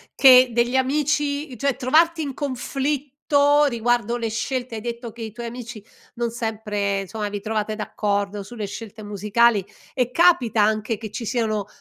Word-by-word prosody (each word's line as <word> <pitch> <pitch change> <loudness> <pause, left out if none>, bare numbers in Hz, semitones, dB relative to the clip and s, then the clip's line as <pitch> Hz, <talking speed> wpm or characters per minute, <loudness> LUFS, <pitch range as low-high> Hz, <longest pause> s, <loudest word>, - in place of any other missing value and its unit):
che 255 -2 +8
degli 240 +2 +1
amici 285 +1 0
cioè 275 +2 0
trovarti 320 +5 +3
in 280 -2 -4
conflitto 285 +2 +1
riguardo 240 -2 0
le 230 -1 -2
scelte 245 +2 -3
hai 220 - -5
detto 235 0 -5
che 230 +2 -12
i 220 -1 -5
tuoi 235 +3 -7
amici 235 -2 -8 0.3
non 235 -1 -2
sempre 210 -4 -2
insomma 210 +2 -4
vi 205 0 -5
trovate 215 0 -2
d'accordo 205 -1 -2
sulle 210 +2 -6
scelte 215 +1 -8
musicali 210 +1 +2 0.3
e 250 -2 0
capita 250 - +4
anche 215 +1 0
che 220 -1 -8
ci 230 +2 -5
siano, 215 -4 -1
235 Hz, 160 wpm, -23 LUFS, 215-265 Hz, 0.3 s, che